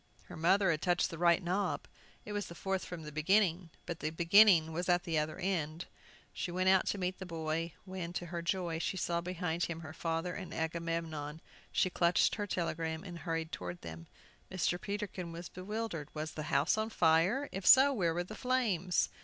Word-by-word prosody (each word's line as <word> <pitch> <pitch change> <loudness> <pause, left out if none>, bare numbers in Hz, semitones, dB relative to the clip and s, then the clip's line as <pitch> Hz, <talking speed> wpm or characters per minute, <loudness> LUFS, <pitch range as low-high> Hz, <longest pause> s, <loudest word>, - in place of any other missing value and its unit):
Her - - -11
mother 185 +4 +3
had 155 -2 -1
touched 175 -1 +1
the 165 - -7
right 170 0 +4
knob. 185 +2 -1 0.4
It 210 - -6
was 205 -2 -2
the 170 - -10
fourth 190 0 -2
from 175 -3 -7
the 150 - -7
beginning; 175 +2 +2 0.2
but 170 -2 -5
the 155 - -1
beginning 170 0 +6
was 175 +3 -2
at 175 0 +3
the 165 -4 0
other 155 +1 -2
end! 175 -3 -2 0.5
She - - -3
went 185 +2 +1
out 190 0 +4
to - - 0
meet 185 -1 -2
the 190 - -6
boy, 165 0 -2
when, 185 -3 -5
to 175 - -3
her 170 - -2
joy, 170 -1 -1
she 190 - -2
saw 170 -1 0
behind 175 -1 -2
him 165 -1 -5
her 155 -1 -8
father 165 +2 -2
and 190 -2 -7
Agamemnon. 160 -2 -3 0.3
She 185 - +2
clutched 175 0 +3
her 205 -1 -2
telegram, 165 -3 -2
and 175 -3 -8
hurried 165 -2 -3
toward 90 -1 -6
them. 80 0 -8 0.4
Mr. 180 -1 0
Peterkin 200 -4 -4
was 170 +1 -7
bewildered. 185 -5 -4
Was 155 +1 -3
the 155 - -5
house 145 +10 +2
on 220 +1 -1
fire? 180 - +3
If 195 0 -4
so, 275 +1 +8
where 170 -8 +1
were 175 - 0
the 185 - -9
flames? 215 -8 +1
175 Hz, 200 wpm, -33 LUFS, 160-190 Hz, 0.5 s, so